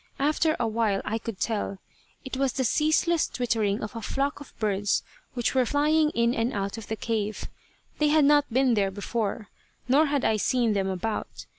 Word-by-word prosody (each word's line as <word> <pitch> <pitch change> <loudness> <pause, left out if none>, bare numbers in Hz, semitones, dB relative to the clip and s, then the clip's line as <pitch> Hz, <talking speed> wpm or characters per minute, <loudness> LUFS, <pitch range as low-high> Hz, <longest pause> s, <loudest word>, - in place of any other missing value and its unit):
After 310 +3 +2
a 235 - +1
while 215 -3 0
I 225 +2 -1
could 225 -4 -6
tell. 210 -3 -2 0.5
It 265 - -5
was 265 -1 0
the 265 - -1
ceaseless 315 +5 +2
twittering 225 -4 -1
of 215 - -6
a 230 - -5
flock 275 +6 -2
of 285 - -12
birds 205 -2 0 0.3
which 240 -2 0
were 260 -1 +3
flying 300 +4 +2
in 235 0 +2
and 230 +1 -1
out 200 -1 -2
of 220 - -10
the 220 - -2
cave. 215 -2 -2 0.5
They 300 - +3
had 300 -1 +4
not 290 -2 +4
been 255 +1 +3
there 200 -3 +2
before, 205 +1 -3 0.4
nor 290 +5 +4
had 285 -1 0
I 220 - +2
seen 235 0 +1
them 195 -1 0
about. 190 +3 -4
235 Hz, 190 wpm, -26 LUFS, 210-280 Hz, 0.5 s, had